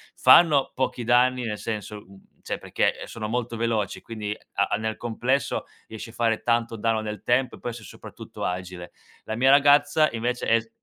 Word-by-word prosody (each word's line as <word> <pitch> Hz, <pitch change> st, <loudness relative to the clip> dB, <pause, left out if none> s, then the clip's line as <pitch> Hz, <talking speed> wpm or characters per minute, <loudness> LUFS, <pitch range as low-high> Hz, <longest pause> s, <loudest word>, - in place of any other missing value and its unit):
Fanno 150 Hz, -5 st, +5 dB
pochi 125 Hz, -2 st, -2 dB
danni, 125 Hz, +1 st, +3 dB
nel 105 Hz, -2 st, -3 dB
senso, 105 Hz, -1 st, -5 dB
mhmm, 95 Hz, 0 st, -20 dB
cioè -, -, -4 dB
perché, -, -, -1 dB
eh, -, -, -9 dB
sono 110 Hz, -2 st, -6 dB
molto 120 Hz, 0 st, -2 dB
veloci, 115 Hz, -4 st, -2 dB
quindi 105 Hz, -2 st, -5 dB, 0.2 s
a 100 Hz, -, +2 dB
a -, -, +3 dB
nel 110 Hz, +1 st, -3 dB
complesso 120 Hz, +4 st, -1 dB, 0.2 s
riesci 110 Hz, +1 st, -8 dB
a -, -, -14 dB
fare 115 Hz, -2 st, 0 dB
tanto 115 Hz, -1 st, 0 dB
danno 115 Hz, 0 st, 0 dB
nel 105 Hz, -1 st, -6 dB
tempo 125 Hz, +2 st, +1 dB
e -, -, -16 dB
poi 120 Hz, -, -4 dB
sei 115 Hz, -2 st, -10 dB
soprattutto -, -, -10 dB
agile. 90 Hz, -1 st, -5 dB, 0.3 s
La 110 Hz, -, -4 dB
mia 130 Hz, +2 st, +4 dB
ragazza 145 Hz, +2 st, +5 dB
invece 120 Hz, +2 st, -2 dB
è 115 Hz, -, +4 dB
s 115 Hz, 0 st, -13 dB
115 Hz, 195 wpm, -25 LUFS, 110-125 Hz, 0.3 s, Fanno